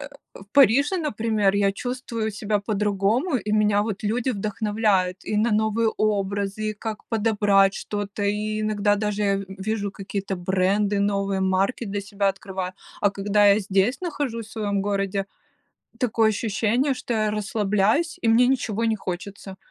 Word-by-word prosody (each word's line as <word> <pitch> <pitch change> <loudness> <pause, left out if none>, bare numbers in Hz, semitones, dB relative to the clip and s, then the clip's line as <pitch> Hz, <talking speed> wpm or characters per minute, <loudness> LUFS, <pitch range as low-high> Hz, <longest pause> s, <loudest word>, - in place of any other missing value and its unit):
э, - - -7 0.3
в - - -12
Париже, 280 - +5
например, 220 - 0
я 200 -1 +2
чувствую 235 -1 -4
себя 210 0 -1
по-другому, 210 - 0
и 210 -2 -4
меня 210 -1 +3
вот 210 -1 -4
люди 235 +5 0
вдохновляют 205 -3 0
и 210 - -2
на 220 +3 +2
новые 220 +1 +2
образы, 205 0 -1
и - - -6
как 215 +1 -6
подобрать 205 -3 +3
что-то, 205 0 -4
и 215 +1 -1
иногда 210 -1 +1
даже 205 -1 0
в 195 - -6 0.2
вижу 210 -2 -1
какие-то 195 -1 -4
бренды, 195 +3 +1
новые 200 -1 0
марки 190 +6 +1
для 200 +1 -3
себя 200 0 -1
открываю. 190 -1 -4 0.3
А 205 - +3
когда 205 +1 +2
я 200 +1 +6
здесь 200 +4 +1
нахожусь 260 -10 -3
в - - -15
своем 205 -3 -1
городе, 195 -1 -1 0.7
такое 230 -3 +2
ощущение, 225 +5 0
что 245 -2 -4
я 215 -1 +1
расслабляюсь 210 - +1
и 230 - +1
мне 235 +2 +5
ничего 230 -4 0
не 225 - +2
хочется, 190 +1 -6
210 Hz, 155 wpm, -24 LUFS, 200-220 Hz, 0.7 s, я